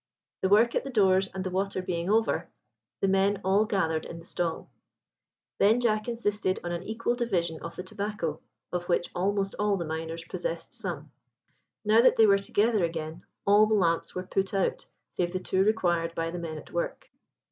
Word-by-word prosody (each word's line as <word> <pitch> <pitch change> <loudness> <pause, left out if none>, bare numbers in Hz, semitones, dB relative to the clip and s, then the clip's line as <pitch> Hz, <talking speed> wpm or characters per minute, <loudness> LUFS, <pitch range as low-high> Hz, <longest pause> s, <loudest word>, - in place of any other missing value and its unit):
The 190 - +1
work 225 +4 +5
at - - 0
the 275 - -6
doors 195 -5 +3
and 190 -1 -4
the 185 - -3
water 195 +1 -1
being 180 -1 -2
over, 220 +2 +1 0.5
the 195 - +3
men 195 +1 +2
all 195 +3 +3
gathered 165 -7 0
in 170 - -8
the 165 - -12
stall. 170 -2 -3 0.9
Then 220 +4 +5
Jack 215 -2 +1
insisted 205 -5 0
on 175 - -3
an 170 0 -3
equal 225 +4 -1
division 180 -10 -1
of 170 - -7
the 180 - -5
tobacco, 190 -5 -3 0.3
of 175 0 -3
which 175 0 +1
almost 195 +2 0
all 205 -1 +2
the 170 - -3
miners 160 +1 -5
possessed - - -4
some. - - -5 0.7
Now 215 +2 +6
that 255 - +5
they 225 - +6
were 200 -1 +5
together 210 +1 +1
again, 165 -1 -3 0.2
all 205 +2 +6
the 215 - +2
lamps 170 -4 +1
were 185 - -2
put 190 +1 -1
out 195 - 0 0.2
save 175 0 -2
the 185 - -1
two 185 +1 +1
required 175 -6 +1
by 165 0 -2
the 175 - -5
men 160 -2 -5
at - - -11
work. - - -4
190 Hz, 190 wpm, -28 LUFS, 170-210 Hz, 0.9 s, Now